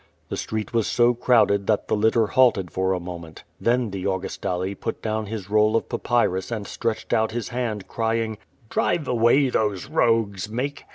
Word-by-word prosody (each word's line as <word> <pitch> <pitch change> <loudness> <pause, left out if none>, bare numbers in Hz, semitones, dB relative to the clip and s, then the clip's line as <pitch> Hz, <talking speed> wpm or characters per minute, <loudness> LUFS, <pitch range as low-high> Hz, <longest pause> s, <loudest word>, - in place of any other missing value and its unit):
The - - -3
street 110 +1 -4
was 115 -2 +1
so 120 0 +3
crowded 115 -5 +3
that 105 -2 +1
the - - +1
litter 110 +2 +3
halted 105 -6 +3
for 95 0 0
a 90 - -1
mo 90 0 -6
ment 80 -1 -12 0.2
Then 120 -2 +1
the 95 -1 -5
Augustale 95 0 -2
put 115 - -5
down 110 -1 -2
his 105 -3 -5
roll 105 +1 +3
of 115 - 0
papyrus 95 -6 0
and 110 -4 -4
stretched 115 +1 -3
out 110 0 +2
his 120 -2 -3
hand, 115 -5 -3
crying: 115 -1 -1 0.3
"Drive 150 +5 0
away 125 +3 +3
these 105 -3 0
rogues! 115 - +1
110 Hz, 175 wpm, -24 LUFS, 100-115 Hz, 0.3 s, so